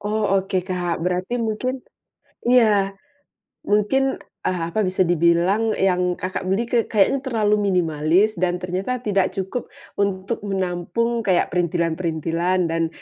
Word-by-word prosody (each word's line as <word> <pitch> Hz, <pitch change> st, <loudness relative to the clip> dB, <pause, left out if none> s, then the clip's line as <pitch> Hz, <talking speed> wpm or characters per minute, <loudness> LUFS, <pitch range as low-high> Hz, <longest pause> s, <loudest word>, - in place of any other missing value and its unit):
Oh 210 Hz, +1 st, -1 dB, 0.2 s
oke 190 Hz, -1 st, -2 dB
Kak, 180 Hz, -2 st, -2 dB
berarti 180 Hz, +6 st, -1 dB
mungkin 245 Hz, +3 st, -2 dB, 0.6 s
iya 205 Hz, -5 st, +4 dB, 0.7 s
mungkin, 265 Hz, +7 st, +2 dB, 0.3 s
eee, 185 Hz, -1 st, 0 dB
apa, 220 Hz, -, -1 dB
bisa 185 Hz, 0 st, +2 dB
dibilang 175 Hz, +6 st, +2 dB
yang 180 Hz, -1 st, +1 dB
Kakak 185 Hz, +1 st, -3 dB
beli 195 Hz, +5 st, +1 dB
ke 240 Hz, -, +1 dB
kayaknya 215 Hz, +6 st, +2 dB
terlalu 220 Hz, -5 st, +1 dB
minimalis 180 Hz, +3 st, +2 dB
dan 180 Hz, -1 st, +1 dB
ternyata 185 Hz, +8 st, -3 dB
tidak 200 Hz, -3 st, +1 dB
cukup 195 Hz, +5 st, -3 dB, 0.3 s
untuk 200 Hz, +2 st, -1 dB
menampung 195 Hz, +5 st, -1 dB
kayak 185 Hz, -4 st, +1 dB
perintilan-perintilan 170 Hz, 0 st, 0 dB
dan 165 Hz, 0 st, +1 dB
190 Hz, 125 wpm, -22 LUFS, 175-215 Hz, 0.7 s, iya